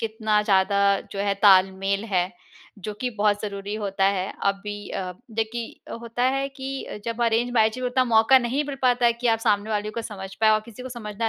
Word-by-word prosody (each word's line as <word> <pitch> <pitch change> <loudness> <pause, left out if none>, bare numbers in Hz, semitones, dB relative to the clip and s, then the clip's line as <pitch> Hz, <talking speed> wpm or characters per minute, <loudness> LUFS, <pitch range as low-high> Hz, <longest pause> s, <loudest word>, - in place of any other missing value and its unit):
कितना 220 -1 0
ज़्यादा 200 0 +3
जो 195 - -6
है 200 0 +1
तालमेल 195 +1 +4
है, 185 -3 0 0.5
जो 210 +2 -5
कि 250 - 0
बहुत 205 0 +2
ज़रूरी 200 0 -5
होता 195 -2 -1
है। 195 -1 0
अभी 205 +1 -2
अ, 185 -1 -4 0.2
देखिए 225 +1 -5
होता 235 +1 -4
है 270 +2 +1
कि 270 0 -6
अ, - - -7
जब 230 +1 -2
अरेंज 235 +1 +1
मैरेज 220 +1 +3
में 250 - -2
उतना 255 +1 +2
मौका 230 +3 +5
नहीं 255 +4 -1
मिल 280 -1 -5
पाता 245 -1 +3
है 235 - +4
कि 240 +1 -4
आप 225 -1 +3
सामने 215 -1 0
वाले 210 0 -1
को 230 +1 -5
समझ 195 -3 -8
पाए 220 - +5
और 215 0 +3
किसी 235 +2 -12
को 260 - -6
समझना 225 -2 -4
215 Hz, 215 wpm, -24 LUFS, 200-235 Hz, 0.5 s, मौका